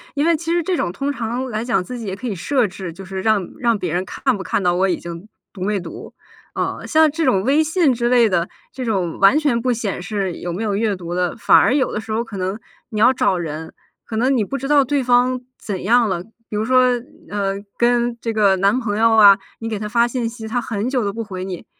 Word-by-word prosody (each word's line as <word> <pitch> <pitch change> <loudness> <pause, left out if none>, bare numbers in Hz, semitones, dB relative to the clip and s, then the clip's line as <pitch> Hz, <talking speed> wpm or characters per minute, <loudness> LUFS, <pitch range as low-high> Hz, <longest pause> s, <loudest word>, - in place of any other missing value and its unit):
因 290 +1 +1
为 335 0 +4
其 330 +2 -4
实 345 0 +1
这 365 +3 0
种 175 - -1
通 275 +8 -2
常 240 0 -3
来 215 0 -3
讲 235 -6 0
自 245 +5 -7
己 225 - -6
也 190 - -3
可 245 +6 -6
以 220 - -2
设 245 +5 +1
置， 185 -2 -7
就 190 +2 -10
是 190 0 -5
让 210 -3 +1
让 235 -4 +2
别 180 -4 -3
人 180 - 0
看 260 +6 -1
不 190 - -6
看 - - -1
到 175 -1 +3
我 190 +2 +2
已 175 - 0
经 170 +3 -8 0.3
读 185 - -11
没 205 0 0
读。 170 -2 -9 0.4
呃， - - -3
像 315 -1 +4
这 320 +3 -2
种 190 -7 +2
微 285 +5 +3
信 315 -3 +2
之 240 0 0
类 240 -2 +5
的， 175 -4 0 0.2
这 260 - -5
种 190 -8 -1
完 195 +10 +6
全 270 -7 +1
不 255 - +1
显 220 -6 -2
示 190 0 -2
有 175 - -5
没 185 +6 -3
有 205 -2 -1
阅 210 -1 0
读 175 -2 -6
的， 180 -1 0
反 - - +5
而 - - +4
有 270 -3 +1
的 210 - -2
时 220 0 -8
候 225 +2 0
可 225 -3 -10
能 190 +3 -3 0.3
你 215 - -4
要 245 +4 +6
找 190 -6 +1
人， 160 -1 -5 0.3
可 220 - -5
能 260 +3 +2
你 220 - +2
不 275 - -4
知 275 +1 -5
道 290 -1 +5
对 280 +1 0
方 250 0 +3 0.2
怎 195 -4 -5
样 230 +2 +3
了， 175 -3 -1 0.3
比 210 - -3
如 215 - 0
说， 255 +1 +4 0.4
呃， 200 -1 -1 0.2
跟 240 0 +2
这 230 -1 -3
个 200 -3 +3
男 200 +5 +3
朋 210 -2 -2
友 225 0 +4
啊， 205 -2 +8 0.2
你 225 - -4
给 215 -2 -3
他 210 - -4
发 235 +2 +3
信 240 -1 -2
息， 225 -1 -8
他 225 +3 -1
很 225 -1 -3
久 250 -5 0
都 200 - -2
不 230 +1 -4
回 185 -3 -6
你， 185 -3 -6
220 Hz, 280 characters per minute, -20 LUFS, 195-250 Hz, 0.4 s, 啊